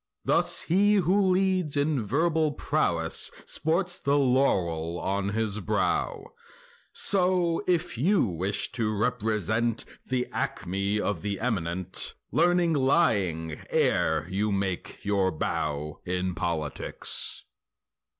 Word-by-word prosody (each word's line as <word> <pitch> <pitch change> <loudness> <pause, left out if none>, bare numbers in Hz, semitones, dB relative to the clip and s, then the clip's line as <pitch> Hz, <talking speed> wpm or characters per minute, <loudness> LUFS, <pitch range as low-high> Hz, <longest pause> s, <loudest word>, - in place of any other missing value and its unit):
Thus - - +1
he 205 +4 +3
who 195 +1 +3
leads 185 -5 +2
in 145 -3 +1
verbal 155 +6 +1
prow 115 - 0
Ness 80 - +3 0.2
sports 175 +3 -1
the 140 +1 +1
laurel 90 - +1
on 100 0 -1
his 110 0 -1
brow— 110 - -1 0.6
So 180 -2 +1
if 175 -9 0
you 190 +8 +3
wish 95 +1 -2
to 110 -3 -1
represent 110 0 0 0.2
The 125 -1 -1
acme 100 +3 -2
of 105 - -2
the 100 -1 -3
eminent, 95 -6 -3 0.2
Learning 175 0 +3
lying 100 - +1
ere 80 0 +1
you 100 +3 -1
make 95 -2 -3
your 100 -2 +2
bow 75 -1 -3
In 90 0 -2
politics. 80 -4 -1
110 Hz, 110 wpm, -27 LUFS, -, 0.6 s, he